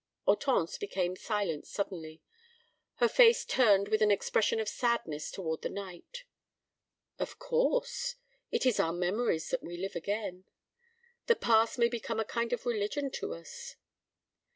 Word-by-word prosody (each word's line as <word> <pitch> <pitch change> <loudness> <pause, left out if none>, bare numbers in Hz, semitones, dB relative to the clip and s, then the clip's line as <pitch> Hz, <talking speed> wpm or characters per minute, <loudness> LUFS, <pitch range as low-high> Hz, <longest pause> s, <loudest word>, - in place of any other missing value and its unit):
Hortense - - +2
became 185 - -1
silent 195 -7 -2
suddenly, 165 -5 -5 0.7
her - - +4
face 480 0 +6
turned 205 -5 +4
with 215 0 +2
an 210 - +5
expression 210 +2 +2
of 220 - -2
sadness 205 -12 -1
toward 160 -4 -4
the - - -2
night. 200 - -8 1.0
"Of - - -4
course. - - 0 0.3
It - - 0
is 250 -4 +3
in - - +4
our 165 - -1
memories 180 0 0
that - - -1
we 175 +1 -7
live 195 +3 -4
again. 190 0 -3 0.8
The 470 - +5
past 225 - +3
may 235 -1 +4
become 230 -1 -3
a 220 - 0
kind 235 +2 -2
of 245 - -2
religion 240 +5 -1
to 80 - -4
us." 85 - -10
215 Hz, 150 wpm, -31 LUFS, 180-245 Hz, 1.0 s, face